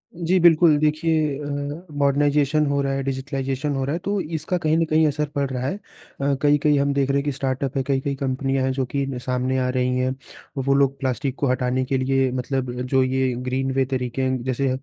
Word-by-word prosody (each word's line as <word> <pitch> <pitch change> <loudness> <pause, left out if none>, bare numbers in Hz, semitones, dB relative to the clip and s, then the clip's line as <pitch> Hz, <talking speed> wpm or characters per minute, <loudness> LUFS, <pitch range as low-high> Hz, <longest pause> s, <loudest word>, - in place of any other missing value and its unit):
जी 175 +2 +1
बिल्कुल। 165 -2 +6
देखिए 155 -1 +1
अ, 145 +3 -5
मॉडर्नाइज़ेशन 145 +1 +2
हो 140 -1 +1
रहा 135 0 -1
है, 135 0 -2
डिजिटाइज़ेशन 135 +1 -2
हो 135 - -1
रहा 140 - -2
है, 170 - -2
तो 200 +2 -2
इसका 160 +2 -3
कहीं 160 -2 +1
न 165 - +2
कहीं 155 0 +4
असर 150 +1 0
पड़ 140 -1 0
रहा 130 -1 -3
है। 145 - -2 0.5
अ, 140 0 +2
कई-कई 145 0 +3
हम 140 0 +1
देख 140 -1 +1
रहे 140 - +2
हैं 140 - -2
कि 145 - 0
स्टार्टअप 135 0 -2
है, 135 - +1
कई-कई 140 0 0
कंपनियाँ 135 0 -1
हैं 130 - +1
जो 130 -1 -1
कि 140 -1 0
न 135 -2 -4
सामने 125 +1 0
आ 125 - 0
रही 125 0 0
हैं। 130 +1 0 0.5
वो 140 +1 +2
लोग 140 0 +2
प्लास्टिक 130 0 -2
को 140 - +1
हटाने 125 0 0
के 135 +1 0
लिए 130 0 +1
मतलब 130 0 -2
जो 130 +1 +2
ये 130 0 0
ग्रीन 135 +1 -1
वे 130 0 +1
तरीके 125 0 -3
हैं, 130 -1 0
जैसे 130 +1 0
135 Hz, 225 wpm, -23 LUFS, 130-145 Hz, 0.5 s, बिल्कुल